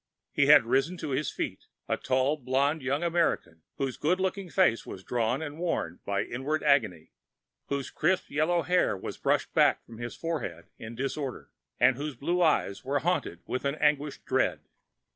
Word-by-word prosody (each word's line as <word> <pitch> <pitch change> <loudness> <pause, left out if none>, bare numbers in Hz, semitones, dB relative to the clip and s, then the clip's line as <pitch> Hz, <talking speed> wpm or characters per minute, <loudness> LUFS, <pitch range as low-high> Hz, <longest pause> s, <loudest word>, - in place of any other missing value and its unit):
He - - +2
had - - +8
risen 135 +9 +1
to 155 -3 -5
his 135 +2 0
feet, - - -5 0.2
a - - +1
tall, 130 +3 +1
blond 140 +3 0
young 135 +5 -1
American 165 - 0 0.2
whose 135 -2 -2
good 180 +5 +1
looking 190 0 -2
face 165 -11 +3
was 95 - -9
drawn 120 +6 0
and 150 +1 -7
worn 130 - -2
by 100 0 0
inward 140 +6 -2
agony, 110 - +2 0.6
whose 140 -1 -3
crisp 180 +4 0
yellow 160 +4 +2
hair 180 - +2
was - - -7
brushed - - 0
back - - +3
from 115 -1 -12
his 120 0 -5
forehead 165 -2 -4
in 110 +1 -8
disorder, 135 +1 -4 0.3
and 130 - +5
whose 145 0 -4
blue 175 +8 0
eyes 155 - +2
were 140 +2 0
haunted 145 - -1
with 130 - -3
an 140 +1 0
anguished 150 -1 0
dread. - - +1
140 Hz, 175 wpm, -28 LUFS, 125-160 Hz, 0.6 s, had